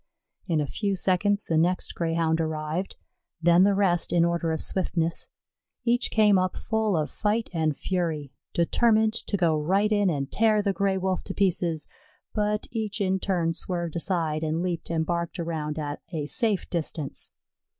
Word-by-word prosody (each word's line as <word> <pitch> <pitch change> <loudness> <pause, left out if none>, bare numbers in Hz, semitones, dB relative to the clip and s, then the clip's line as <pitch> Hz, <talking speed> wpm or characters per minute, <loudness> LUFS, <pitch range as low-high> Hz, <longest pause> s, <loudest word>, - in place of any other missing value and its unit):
In 165 -4 +1
a 150 - +1
few 200 +7 -2
seconds 200 +2 +2
the 160 -1 +2
next 180 +3 0
Greyhound 165 -1 0
arrived, 160 +3 -3 0.4
then 170 +1 +5
the 200 +1 +5
rest 185 -4 +1
in 170 -1 +4
order 170 -1 0
of 160 - -1
swiftness. 170 -3 -1 0.6
Each 240 +1 +2
came 210 -3 +4
up 185 0 -1
full 220 -4 0
of 155 -1 -1
fight 215 +2 -1
and 155 -3 0
fury, 160 -7 -2 0.2
determined 220 +5 +3
to 210 -2 -2
go 165 -4 +2
right 195 +7 +2
in 205 -2 +3
and 140 -4 -2
tear 215 -1 +3
the 200 -1 +1
Gray 195 -1 +1
wolf 190 0 -1
to 190 - -5
pieces; 175 -5 0 0.5
but 210 0 0
each 220 -2 -3
in 190 -1 +1
turn 175 -4 0
swerved 170 -1 -2
aside, 165 -3 -1
and 160 +2 -1
leaped 175 -2 -3
and 160 -1 0
barked 170 +1 -2
around 160 -2 -3
at 145 -1 -4
a 155 -4 -2
safe 210 - 0
distance. 160 -4 -3
175 Hz, 170 wpm, -26 LUFS, 160-200 Hz, 0.6 s, then